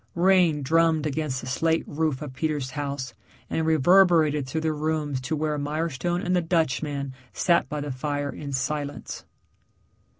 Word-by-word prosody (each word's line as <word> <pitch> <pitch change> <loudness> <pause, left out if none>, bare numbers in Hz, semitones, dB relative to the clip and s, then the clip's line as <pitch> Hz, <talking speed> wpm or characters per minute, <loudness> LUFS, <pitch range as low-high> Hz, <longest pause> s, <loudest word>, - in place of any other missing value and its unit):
Rain 175 -4 +4
drummed 160 +1 +3
against 150 -3 -2
the - - -8
slate 160 +5 +1
roof 155 -2 -1
of 140 -3 -7
Peter's 145 -3 -2
house 140 -4 -4 0.4
and 160 0 0
reverberated 160 -2 +4
through 160 +4 -2
the 160 -1 0
rooms 150 -3 -1
to 145 +5 -2
where 150 -1 -1
Mirestone 160 +3 -2
and 180 +1 +1
the 180 - +3
Dutchman 150 -4 -1 0.2
sat 170 -2 +2
by 150 -1 -3
the 145 -1 -4
fire 145 +2 -2
in 145 -2 -7
silence. 145 +2 -3
150 Hz, 155 wpm, -25 LUFS, 140-160 Hz, 0.4 s, Rain